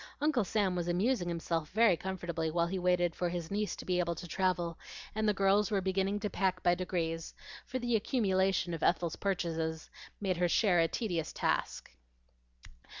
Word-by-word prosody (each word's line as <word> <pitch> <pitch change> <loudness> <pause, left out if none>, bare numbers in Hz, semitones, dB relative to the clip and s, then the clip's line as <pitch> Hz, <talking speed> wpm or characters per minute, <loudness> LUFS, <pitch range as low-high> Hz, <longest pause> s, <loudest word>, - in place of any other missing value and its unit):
Uncle 290 -6 +2
Sam 195 -1 0
was 175 -1 -2
amusing 180 +3 +1
himself 165 -2 -2
very 220 -3 +5
comfortably 170 -3 -3
while 170 +1 +1
he 185 +2 -2
waited 175 -1 +2
for 175 - -1
his 170 -1 -4
niece 210 +1 -1
to - - -9
be 180 -1 +1
able 170 -1 0
to 175 +2 -8
travel, 175 -2 -1 0.3
and 215 0 +1
the - - +5
girls 195 +2 +3
were 205 -3 +1
beginning 190 +2 0
to 210 - 0
pack 185 -2 0
by 175 - +5
degrees, 170 -2 -3 0.3
for 255 - -3
the 240 -2 0
accumulation 190 -6 +1
of 165 - -4
Ethel's 170 -1 +1
purchases 165 -4 -2 0.3
made 190 -3 -1
her 175 0 +2
share 185 -2 +3
a 165 0 +3
serious 175 -9 -2
task. - - -1
180 Hz, 180 wpm, -32 LUFS, 170-200 Hz, 0.3 s, very